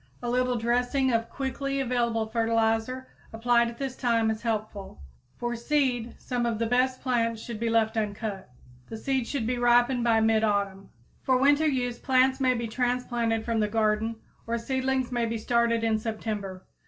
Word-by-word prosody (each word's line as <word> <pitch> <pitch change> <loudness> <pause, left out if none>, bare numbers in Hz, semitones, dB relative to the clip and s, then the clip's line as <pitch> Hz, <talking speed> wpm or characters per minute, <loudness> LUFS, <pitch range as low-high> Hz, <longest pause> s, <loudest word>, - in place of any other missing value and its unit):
A 240 - -1
little 250 0 +1
dressing 245 +3 +1
of 230 0 0
quickly 275 +1 -3
available 235 -3 0
fertilizer 225 +2 0 0.2
applied 235 +1 +2
at 235 0 -7
this 270 -1 -4
time 230 -3 +1
is 220 - -5
helpful. 215 - -4 0.4
For 240 0 -2
seed 245 -2 0
some 245 -2 -2
of 230 -2 -1
the 230 - 0
best 255 +2 +1
plants 230 -3 0
should 225 -1 -7
be 230 0 0
left 225 0 +2
uncut. 210 - -3 0.4
The 225 - -6
seed 260 0 -1
should 260 -6 -2
ripen 245 0 +3
by 230 -1 +3
mid 220 0 +3
autumn. 200 -2 -1 0.3
For 260 -1 +2
winter 285 +4 +4
use 245 -4 -1
plants 265 0 +3
may 255 -1 +2
be 235 -1 -3
transplanted 240 -1 -1
from 230 -1 0
the 210 - +2
garden, 220 +1 0 0.3
or 235 +1 0
seedlings 260 +1 -1
may 240 -1 0
be 230 0 -2
started 230 0 +1
in 220 -1 +1
September. 210 -4 -5
235 Hz, 170 wpm, -27 LUFS, 225-250 Hz, 0.4 s, winter